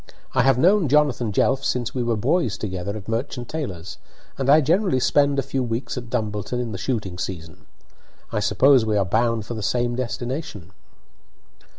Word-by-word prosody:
I 130 - +3
have 135 0 +4
known 185 +4 +4
Jonathan 135 -5 +2
Jelf 130 +6 +1
since 120 -1 -1
we 130 - -2
were 120 -1 0
boys 135 - +1
together 100 0 -4
at 100 - -10
Merchant 120 +2 -3
Taylor's, 95 - -5 0.4
and 135 0 -2
I 150 +2 +8
generally 170 0 +2
spend 140 +2 +2
a 135 - +1
few 135 - -2
weeks 120 +1 -3
at 120 -3 -6
Dumbleton 110 0 -2
in 120 -2 -3
the 95 - -5
shooting 105 -9 -3
season. 80 -5 -7 0.6
I - - 0
suppose 115 +5 +4
we 110 -1 0
are 100 - +2
bound 115 +2 +1
for 120 - -5
the 110 - -5
same 120 +3 0
destination?" 125 - -5
120 Hz, 180 wpm, -23 LUFS, 105-135 Hz, 0.6 s, I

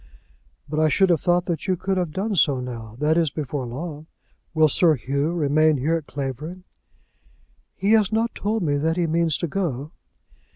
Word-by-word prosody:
"But 150 +1 -2
I 155 - +4
should 190 +4 +3
have 165 - +2
thought 175 0 +2
that 170 -3 -3
you 185 - +2
could 190 +3 -1
have 180 -3 0
done 200 +5 -2
so 145 -6 +3
now; 115 -3 -7
that 155 +4 +2
is, 165 -2 +2
before 140 -2 -4
long. 150 +4 -6 0.5
Will 155 0 +5
Sir 160 +2 +3
Hugh 140 +5 -1
remain 155 -1 +3
here 155 +6 +1
at 160 -3 -4
Clavering?" 145 +7 -5 1.1
"He 200 +2 0
has 215 -2 +4
not 225 +1 0
told 215 0 -1
me 145 -3 +1
that 160 +4 0
he 175 - +2
means 165 -1 +1
to 170 - -2
go." 155 -5 -3
155 Hz, 190 wpm, -23 LUFS, 145-175 Hz, 1.1 s, Will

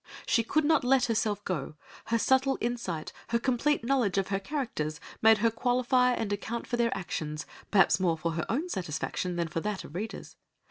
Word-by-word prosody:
She 230 - +3
could 295 +7 +1
not 315 -2 +3
let 260 +1 +4
herself 215 -3 -1
go; 155 -4 -3 0.3
her 230 - +1
subtle 265 +4 +3
insight, 225 -10 -3
her 235 - +1
complete 255 +3 +1
knowledge 235 -7 +1
of 195 -1 0
her 195 -1 0
characters, 195 - -3 0.2
made 220 0 +7
her 225 +2 +2
qualify 250 +2 +2
and 210 -4 -1
account 230 +3 -4
for - - -2
their 235 -4 +1
actions, 155 -5 -4 0.2
perhaps 195 -4 +4
more 170 -3 +2
for 165 +1 -2
her 165 +1 -2
own 295 +10 0
satisfaction 180 - -3
than 170 -1 -1
for 165 - -3
that 210 +2 -3
of - - -11
readers. 210 +6 -6
220 Hz, 190 wpm, -29 LUFS, 180-245 Hz, 0.3 s, made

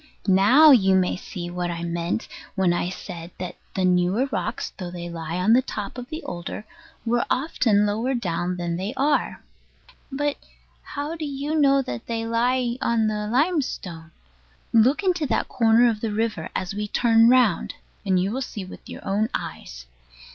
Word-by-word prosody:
Now 215 +11 +7
you 195 -7 +5
may 185 -1 +2
see 175 -1 -7
what 175 0 -2
I 170 0 -4
meant 170 +4 -2 0.3
when 190 -3 +2
I 175 0 -1
said 175 -2 -8
that 180 -1 -6 0.2
the 190 - +1
newer 180 +7 +2
rocks, - - -3
though 180 -3 -6
they 175 -1 -7
lie 165 0 -5
on 190 +5 +3
the 250 - +6
top 210 -5 -6
of 250 +1 -8
the 315 +2 -6
older, 175 +4 -6 0.4
were 235 +1 +2
often 235 -7 +2
lower 225 +6 0
down 180 -4 -2
than 170 -1 -2
they 200 +8 -4
are. 290 +2 0 0.7
But 290 +1 -1 0.4
how 295 +3 -5
do 325 - -6
you 285 +1 -3
know 275 -3 +4
that 120 - -6
they 225 -1 -2
lie 240 +1 +1
on 230 -1 +2
the 210 -1 -1
limestone? 245 - -1 0.6
Look 245 - +4
into 355 -5 +1
that 225 - 0
corner 230 +1 +4
of 220 -3 -1
the 225 - -2
river, 215 -6 -2
as 185 +1 -2
we 210 +1 -3
turn 230 +1 +4
round, 245 -8 +3 0.3
and 190 -3 +2
you 190 +3 0
will 260 +4 -2
see 210 -6 -5
with 185 - -12
your - - -9
own 210 +3 +1
eyes. - - -7
215 Hz, 175 wpm, -24 LUFS, 180-255 Hz, 0.7 s, Now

